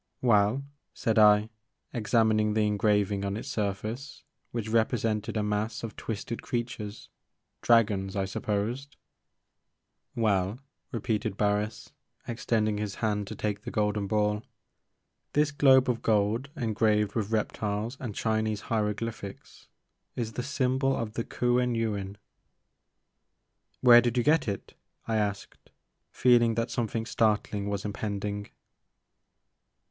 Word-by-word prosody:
"Well?" 110 Hz, +2 st, +3 dB, 0.3 s
said 115 Hz, -3 st, +1 dB
I, 105 Hz, +1 st, +6 dB, 0.4 s
examining 110 Hz, -2 st, +2 dB
the 110 Hz, -1 st, +3 dB
engraving 105 Hz, -1 st, +1 dB
on 100 Hz, +1 st, -2 dB
its 125 Hz, -, -6 dB
surface, 110 Hz, +4 st, -4 dB, 0.3 s
which 115 Hz, -2 st, -4 dB
represented 110 Hz, -1 st, 0 dB
a 105 Hz, -, +1 dB
mass 105 Hz, +2 st, -2 dB
of 115 Hz, -2 st, -5 dB
twisted 115 Hz, +1 st, -5 dB
creatures,^Kiragons, 110 Hz, -2 st, -1 dB
I 100 Hz, -1 st, 0 dB
supposed. 110 Hz, +8 st, -3 dB, 1.2 s
"Well," 100 Hz, -2 st, +1 dB, 0.3 s
repeated 110 Hz, -3 st, -2 dB
Barris, 105 Hz, +1 st, -1 dB, 0.4 s
extending 110 Hz, -3 st, 0 dB
his 105 Hz, -2 st, -3 dB
hand 105 Hz, -2 st, -1 dB
to 110 Hz, -, -6 dB
take 105 Hz, 0 st, -2 dB
the 120 Hz, -, -6 dB
golden 105 Hz, -2 st, 0 dB
ball, 105 Hz, 0 st, +1 dB, 0.5 s
" -, -, -52 dB
this 150 Hz, 0 st, +3 dB
globe 135 Hz, -2 st, +5 dB
of 120 Hz, -2 st, 0 dB
gold 110 Hz, +5 st, +1 dB
en 115 Hz, -5 st, -1 dB
graved 105 Hz, -2 st, +2 dB
with 110 Hz, -3 st, -1 dB
reptiles 110 Hz, +1 st, -1 dB
and 110 Hz, -6 st, -5 dB
Chinese 110 Hz, -2 st, 0 dB
hieroglyphics 105 Hz, -1 st, -3 dB, 0.5 s
is 115 Hz, -2 st, -3 dB
the 125 Hz, -, -2 dB
symbol 135 Hz, 0 st, +1 dB
of 110 Hz, -2 st, -3 dB
the 115 Hz, -, -2 dB
Kuen 125 Hz, 0 st, +1 dB
Yuin." 100 Hz, -4 st, -2 dB, 0.9 s
" -, -, -48 dB
Where 120 Hz, -1 st, +9 dB
did 120 Hz, 0 st, -1 dB
you 120 Hz, -, +3 dB
get 150 Hz, -1 st, +3 dB
it? 100 Hz, -2 st, -4 dB, 0.2 s
" -, -, -39 dB
I 110 Hz, -, +1 dB
asked, 100 Hz, -2 st, -3 dB, 0.4 s
feeling 120 Hz, -2 st, +4 dB
that 115 Hz, +1 st, -1 dB
something 115 Hz, -1 st, -2 dB
startling 105 Hz, -3 st, 0 dB
was 100 Hz, 0 st, -3 dB
impending. 100 Hz, 0 st, -3 dB
110 Hz, 125 wpm, -28 LUFS, 105-120 Hz, 1.2 s, Where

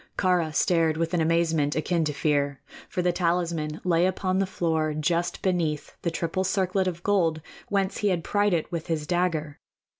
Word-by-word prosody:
Kāra 180 Hz, -4 st, +2 dB
stared 165 Hz, -1 st, +2 dB
with 165 Hz, +1 st, -1 dB
an 175 Hz, -, +2 dB
amazement 160 Hz, -3 st, +1 dB
akin 165 Hz, +1 st, 0 dB
to 150 Hz, -, 0 dB
fear; 145 Hz, -1 st, 0 dB, 0.3 s
for 180 Hz, -, -2 dB
the 180 Hz, -, +3 dB
talisman 170 Hz, -3 st, -1 dB
lay 175 Hz, 0 st, +3 dB
upon 185 Hz, 0 st, 0 dB
the 195 Hz, -, +1 dB
floor 160 Hz, -4 st, 0 dB
just 170 Hz, +3 st, -1 dB
beneath 165 Hz, -5 st, -1 dB
the 170 Hz, -, 0 dB
triple 170 Hz, +3 st, -2 dB
circlet 190 Hz, 0 st, +1 dB
of 170 Hz, -1 st, -4 dB
gold 170 Hz, -6 st, +2 dB, 0.3 s
whence 195 Hz, -1 st, 0 dB
he 210 Hz, -, 0 dB
had 180 Hz, -4 st, 0 dB
pried 205 Hz, +2 st, +1 dB
it 160 Hz, -, -3 dB
with 170 Hz, -2 st, -4 dB
his 160 Hz, -3 st, -1 dB
dagger. 165 Hz, -4 st, -1 dB
170 Hz, 180 wpm, -26 LUFS, 155-185 Hz, 0.3 s, the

